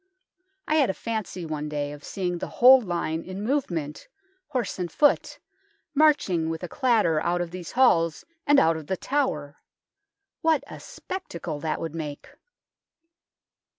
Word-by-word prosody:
I 310 - +2
had 280 -4 +4
a 190 - -1
fancy 215 -6 -4
one 150 -1 -4
day 145 -1 -3
of 145 0 -10
seeing 180 -3 -3
the - - -4
whole 255 +2 +8
line 170 -5 -2
in 185 +3 -7
movement, 175 - -2 0.4
horse 250 -10 -3
and 175 -2 -3
foot, 290 - +2 0.6
marching 285 - +3
with 165 +1 -4
a - - -3
clatter 215 - +2
out 175 +1 0
of 175 -1 -3
these 180 -2 -7
halls 165 -11 +3 0.2
and 290 -1 +6
out 165 0 +3
of 155 -2 -9
The 190 - -1
Tower. 150 - -2 0.8
What 320 -2 +2
a - - -10
spectacle 170 - -6
that 155 0 -2
would 165 -1 -4
make 150 -3 -6
175 Hz, 150 wpm, -26 LUFS, 160-255 Hz, 0.8 s, whole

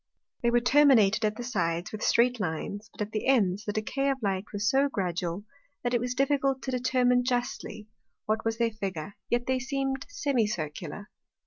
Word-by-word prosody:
They 235 - +3
were 240 0 +3
terminated 245 -6 +5
at 215 0 0
the 245 - -6
sides 170 -8 -1
with 215 - -6
streight 245 +1 +3
Lines, 200 +3 -4
but - - -3
at 210 - -8
the 215 +2 -2
ends, 205 -6 +2
the 210 - -1
decay 255 +6 -1
of 270 - 0
Light 195 -1 0
was 205 +1 -2
so 275 +1 +3
gradual, 180 -3 -2 0.4
that 245 0 -1
it 240 - +3
was 245 0 -2
difficult 275 -1 +1
to 260 - -3
determine 250 0 +2
justly, 245 -4 -3 0.4
what 220 +1 0
was 225 0 -1
their 230 -1 +1
Figure; 195 -4 -5 0.2
yet 240 0 +1
they 260 0 +1
seem'd 270 +1 -2
Semicircular. 205 - -2
230 Hz, 185 wpm, -28 LUFS, 205-255 Hz, 0.4 s, terminated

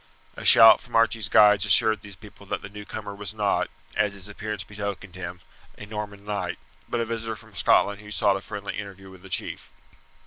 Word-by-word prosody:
A - - -9
shout 115 0 +8
from 120 - -10
Archie's 115 -1 +2
guides 105 -2 +6
assured 105 +1 +4
these 100 -1 -11
people 100 0 -15
that - - -4
the - - -7
newcomer 105 0 -7
was 100 +1 -6
not, 105 -2 0 0.3
as 105 -1 +1
his 100 0 -6
appearance 105 -1 -5
betokened 100 -2 -6
him, 90 -1 -7 0.4
a 100 - -9
Norman 105 -1 -7
knight, 95 -4 -3 0.3
but 120 - -1
a 115 - 0
visitor 115 -1 -4
from 110 -1 -16
Scotland 100 +3 +2
who 105 - -12
sought 100 -1 +2
a 95 - -4
friendly 100 0 -6
interview 95 -1 -8
with 95 -1 -15
the 95 - -13
chief. - - -3
105 Hz, 200 wpm, -25 LUFS, 100-110 Hz, 0.4 s, shout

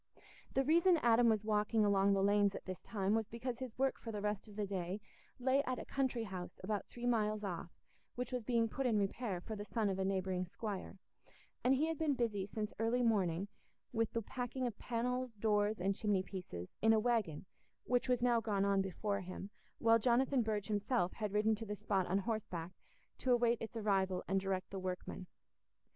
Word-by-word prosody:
The 270 - +4
reason 335 +5 +5
Adam 235 0 +6
was 215 -1 +1
walking 210 0 +2
along 200 0 +4
the 195 0 +2
lanes 205 0 +3
at - - -7
this 185 -1 -5
time 200 -1 -1
was 220 -1 +1
because 235 +1 -4
his 255 -3 -6
work 270 0 +1
for 230 - -6
the 210 - -3
rest 210 +1 -2
of 210 - -12
the 210 -1 -1
day 190 0 -3 0.4
lay 260 +2 +3
at 255 -2 -2
a - - -6
country 260 -4 0
house 185 -4 -6
about 205 +1 -2
three 240 0 -7
miles 215 -3 +1
off, 175 -3 -4 0.5
which 250 +2 -3
was 250 -2 -2
being 230 0 +2
put 265 +4 -1
in 225 -3 +2
repair 200 -1 -1
for 220 +5 -6
the 205 - -5
son 210 -1 0
of 190 - -3
a - - +1
neighbouring 190 -1 0
squire; 200 0 -5 0.7
and 260 +2 +5
he 290 +4 +2
had 325 -2 -2
been 305 -3 +2
busy 215 -6 -1
since 210 0 -4
early 235 +2 +2
morning 195 -5 +2 0.5
with 225 -1 +1
the 230 - -1
packing 250 +3 -3
of 230 -4 -4
panels, 250 0 -2
doors, 210 0 +1
and 195 +2 +1
chimney 205 -3 +1
pieces, 175 - -7
in 225 0 +6
a 220 - +4
waggon 215 -10 0 0.4
which 250 +1 +1
was 245 -1 +2
now 240 -2 +4
gone 205 -3 +1
on 200 -1 +3
before 200 +2 -2
him, 185 +2 -7 0.3
while 230 0 +5
Jonathan 255 +3 +3
Burge 215 -3 -1
himself 210 -2 +1
had 210 -3 -3
ridden 210 +2 +3
to 215 +1 -4
the 210 - -3
spot 200 -3 0
on 185 - +2
horseback, 195 -5 -3 0.5
to 255 - +1
await 240 -1 +3
its 225 +1 -5
arrival 190 -4 +1
and 195 0 +2
direct 190 -1 -2
the 195 - -4
workmen. 185 0 -4
215 Hz, 205 wpm, -36 LUFS, 195-240 Hz, 0.7 s, Adam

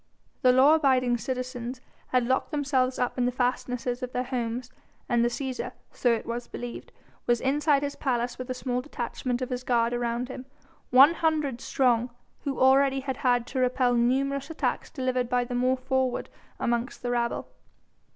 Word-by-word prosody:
The 255 -3 +6
law 265 +4 +6
abiding 255 -6 +3
citizens 255 0 -4 0.3
had 250 -2 +2
locked 260 +2 0
themselves 270 -4 0
up 250 0 -1
in 245 - +2
the - - +1
fastnesses 250 0 -1
of 250 0 -5
their 250 - 0
homes, 250 -1 -3 0.4
and 240 -2 +2
the 240 - +3
Cæsar 260 +1 -4 0.2
so 245 - +1
it 230 - -1
was 235 +1 -4
believed 240 0 -7 0.4
was 240 -1 +3
inside 285 +1 +2
his 285 0 -3
palace 245 -2 -1
with 255 - -6
a 255 - -2
small 250 -1 -2
detachment 250 -2 -3
of 255 - -5
his 250 0 -3
guard 235 -1 +2
around 240 0 -1
him, 255 0 -8 0.4
one 270 +6 +8
hundred 305 -7 0
strong, 245 -2 +2 0.4
who 275 -2 -2
already 270 +1 +4
had 265 -1 -4
had 245 -3 +2
to 260 - -4
repel 255 0 +2
numerous 270 +4 +1
attacks 325 - -2
delivered 255 -3 -1
by 250 0 +2
the 245 - -6
more 255 +1 +2
forward 260 -1 -1 0.3
amongst 235 +2 -1
the 245 - -1
rabble. 235 -1 -1
255 Hz, 175 wpm, -27 LUFS, 245-265 Hz, 0.4 s, one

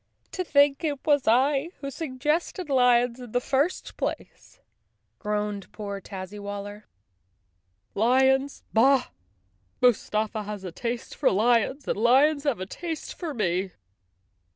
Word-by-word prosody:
"To 370 - -3
think 285 -2 +3
it 295 -3 -1
was 290 -3 +2
I 270 +6 +3
who 275 -1 -5
suggested 300 +4 -2
lions 245 -1 +3
in 245 -3 -10
the 245 - +3
first 280 +8 -1
place," - - -6 0.6
groaned 210 -1 -3
poor 200 -2 -6
Tazzywaller. 205 +2 -7 1.1
"Lions! 265 +5 +2
Bah! 260 +3 +4 0.7
Mus¬ 245 -3 +3
tafa 215 0 -1
has 205 -1 -6
a 185 - -6
taste 235 +6 -4
for - - +2
lions 240 +6 +1
and - - -1
lions 275 +6 +4
have 265 -9 0
a 185 - -3
taste 325 - -6
for 325 -5 -6
me!" 185 -3 -1
245 Hz, 130 wpm, -26 LUFS, 210-280 Hz, 1.1 s, Bah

